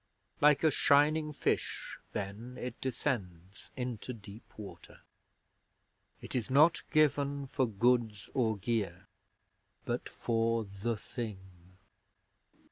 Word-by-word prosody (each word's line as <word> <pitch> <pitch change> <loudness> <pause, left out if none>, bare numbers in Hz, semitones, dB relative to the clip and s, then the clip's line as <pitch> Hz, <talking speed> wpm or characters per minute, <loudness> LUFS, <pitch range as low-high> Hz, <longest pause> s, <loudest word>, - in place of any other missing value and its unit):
Like 150 0 +6
a 160 - +5
shining 150 +3 +4
Fish 150 - -2
Then 105 +5 -5
it 125 -1 -6
descends 100 - -3
Into 125 -1 -3
deep 105 0 -12
Water. 105 -2 -10 1.2
It - - -7
is 125 -1 -1
not 155 +6 +5
given 145 -2 +2
For 130 -1 0
goods 115 -1 +1
or 110 -4 +1
gear, 100 -4 -2 0.8
But - - -2
for 115 0 0
The 100 +3 -3
Thing. 95 -6 -8
115 Hz, 105 wpm, -32 LUFS, 100-135 Hz, 1.2 s, Like